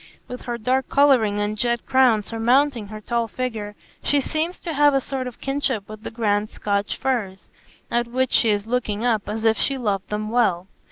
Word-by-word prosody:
With 250 Hz, -, -7 dB
her 240 Hz, -1 st, -3 dB
dark 255 Hz, +4 st, 0 dB
colouring 250 Hz, -8 st, +4 dB
and 205 Hz, +1 st, -1 dB
jet 235 Hz, +2 st, -1 dB
crown 255 Hz, -5 st, +4 dB
surmounting 235 Hz, +1 st, +1 dB
her 215 Hz, +1 st, -8 dB
tall 235 Hz, +2 st, -1 dB
figure, 220 Hz, -4 st, -4 dB, 0.3 s
she 290 Hz, -, +2 dB
seems 315 Hz, +6 st, -2 dB
to 335 Hz, -, -4 dB
have 290 Hz, -1 st, +4 dB
a -, -, +4 dB
sort 265 Hz, -1 st, -4 dB
of 250 Hz, -, -9 dB
kinship 270 Hz, -7 st, -1 dB
with 215 Hz, 0 st, -10 dB
the -, -, -6 dB
grand 210 Hz, -2 st, 0 dB
Scotch 200 Hz, 0 st, -2 dB
firs, 215 Hz, -8 st, -2 dB, 0.4 s
at 240 Hz, 0 st, +1 dB
which 255 Hz, +2 st, 0 dB
she 230 Hz, -, +4 dB
is 205 Hz, -1 st, +1 dB
looking 230 Hz, -2 st, -1 dB
up 220 Hz, -4 st, 0 dB
as 220 Hz, +2 st, -3 dB
if 225 Hz, 0 st, +3 dB
she 275 Hz, -, 0 dB
loved 205 Hz, -6 st, -2 dB
them 215 Hz, +1 st, -3 dB
well. 200 Hz, -7 st, +2 dB
235 Hz, 200 wpm, -23 LUFS, 210-260 Hz, 0.4 s, colouring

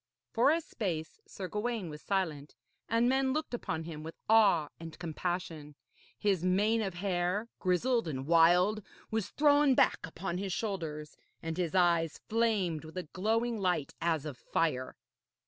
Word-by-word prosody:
For 245 Hz, +3 st, +4 dB
a 325 Hz, +2 st, +3 dB
space 170 Hz, -, -4 dB
Sir 190 Hz, -, -6 dB
Gawaine 215 Hz, -1 st, -2 dB
was 150 Hz, -1 st, -8 dB
silent, 160 Hz, -7 st, -2 dB, 0.3 s
and 230 Hz, +2 st, +3 dB
men 265 Hz, +1 st, +2 dB
looked 310 Hz, -3 st, -3 dB
upon 160 Hz, -9 st, -3 dB
him 160 Hz, -2 st, -7 dB
with 160 Hz, +1 st, -8 dB
awe 200 Hz, -9 st, +5 dB
and 165 Hz, -1 st, -9 dB
compassion. 165 Hz, -3 st, -4 dB, 0.4 s
His 195 Hz, -5 st, +1 dB
mane 205 Hz, +5 st, +2 dB
of 195 Hz, -4 st, -3 dB
hair, 185 Hz, +3 st, -1 dB
grizzled 225 Hz, +5 st, +1 dB
and 135 Hz, -4 st, -4 dB
wild, 175 Hz, +6 st, +4 dB, 0.3 s
was 220 Hz, -3 st, -1 dB
thrown 290 Hz, -2 st, +4 dB
back -, -, +4 dB
upon 175 Hz, +2 st, -4 dB
his 195 Hz, -2 st, -3 dB
shoulders, 160 Hz, -9 st, -4 dB, 0.3 s
and 165 Hz, 0 st, -3 dB
his 180 Hz, 0 st, -2 dB
eyes 170 Hz, -3 st, +2 dB
flamed 210 Hz, -8 st, +1 dB
with 160 Hz, +3 st, -10 dB
a 185 Hz, -, -2 dB
glowing 225 Hz, +4 st, 0 dB
light 180 Hz, -7 st, 0 dB
as 160 Hz, -3 st, 0 dB
of 145 Hz, -5 st, -6 dB
fire. 130 Hz, -6 st, -1 dB
180 Hz, 155 wpm, -31 LUFS, 165-220 Hz, 0.4 s, awe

